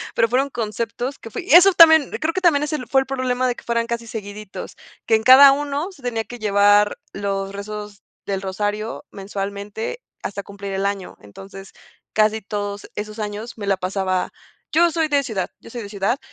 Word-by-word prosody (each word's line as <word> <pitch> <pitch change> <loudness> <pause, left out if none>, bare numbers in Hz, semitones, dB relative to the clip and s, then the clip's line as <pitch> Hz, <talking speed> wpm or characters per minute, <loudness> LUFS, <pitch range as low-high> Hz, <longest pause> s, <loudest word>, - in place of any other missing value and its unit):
Pero 230 - +3
fueron 265 +4 +1
conceptos 230 +3 -4
que 225 - -10
fui - - -5
Y 390 - 0
eso 365 +3 +9
también, 320 -4 +7
creo 320 +1 -1
que 375 - -2
también 310 -5 +4
es 300 +1 -3
el 255 -5 -3
fue 270 - +4
el 265 - -2
problema 255 -1 -1
de 245 - -1
que - - -13
fueran 235 0 -1
casi 235 -1 -3
seguiditos, 210 -2 -8 0.3
que 225 - +4
en 220 - 0
cada 270 +2 +9
uno 290 +6 -3
se 285 - -18
tenía 230 -3 -2
que 245 +3 -10
llevar 205 0 +3
los 195 -1 -3
rezos 210 0 -7 0.2
del 195 -1 -2
rosario 205 +6 -3
mensualmente 200 - -5 0.2
hasta 200 0 -4
cumplir 200 -1 -7
el 195 +1 -1
año. 200 -2 -3
Entonces, 195 - -12 0.4
casi 215 0 +2
todos 205 0 -5
esos 215 +1 -6
años 210 +3 -5
me 205 - -5
la 195 -1 +1
pasaba 185 0 -1 0.4
Yo 340 +1 +4
soy 325 -1 0
de 285 -2 +2
ciudad, 205 -7 -3
yo - - -13
soy 235 0 -6
de 205 - -7
ciudad 205 +6 -1
215 Hz, 200 wpm, -21 LUFS, 200-265 Hz, 0.4 s, eso